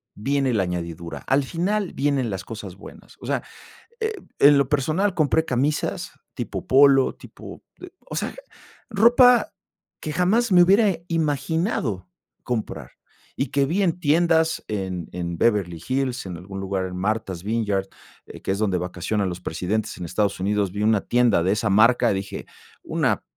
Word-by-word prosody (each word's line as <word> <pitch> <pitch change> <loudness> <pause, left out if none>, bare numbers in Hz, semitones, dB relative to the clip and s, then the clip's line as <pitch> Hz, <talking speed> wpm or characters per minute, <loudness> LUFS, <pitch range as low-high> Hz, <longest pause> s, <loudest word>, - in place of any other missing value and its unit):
viene 135 +3 0
la 100 -3 +2
añadidura, 85 -1 -5
al 140 +1 +3
final 185 +7 -2
vienen 135 -4 0
las 95 -2 -5
cosas 105 -5 -8
buenas. 100 - -14
O - - -9
sea, - - -1 0.6
eh, 440 0 0 0.3
en 145 0 +7
lo 140 -2 +2
personal 155 +8 +1
compré 160 0 +2
camisas 135 +4 -1 0.2
tipo - - -5
polo, 135 0 +5
tipo, - - -12 0.2
eh, 370 - -9 0.2
o - - -7
sea, - - -3 0.5
ropa 240 +3 +5 0.5
que 155 - -4
jamás 210 +7 +2
me 180 -1 +7
hubiera 200 0 +4
imaginado 160 - -1 0.3
comprar, 105 - -4 0.5
y 135 - 0
que 140 +2 +1
vi 180 +8 0
en 175 -2 +1
tiendas 160 +1 +2
en 95 -5 -4
en 85 -1 -4
Beverly 95 -7 +1
Hills, 130 -2 -1
en 90 -2 -6
algún 95 +2 -8
lugar, 95 -1 -2
en 90 0 -6
Martha's 95 -2 -2
Vineyard, 105 -3 -1 0.6
que - - -1
es 100 - -2
donde 100 -4 +1
vacacionan 90 +3 -2
los 90 - -6
presidentes 105 +6 -3
en 90 - -7
Estados 100 +4 -1
Unidos, 100 -1 0
vi 105 - -2
una 110 -2 +3
tienda 120 -6 +2
de 95 - +2
esa 105 0 -1
marca, 115 +4 +4
dije: 95 0 -5 0.4
"Una - - 0
115 Hz, 160 wpm, -23 LUFS, 95-155 Hz, 0.6 s, en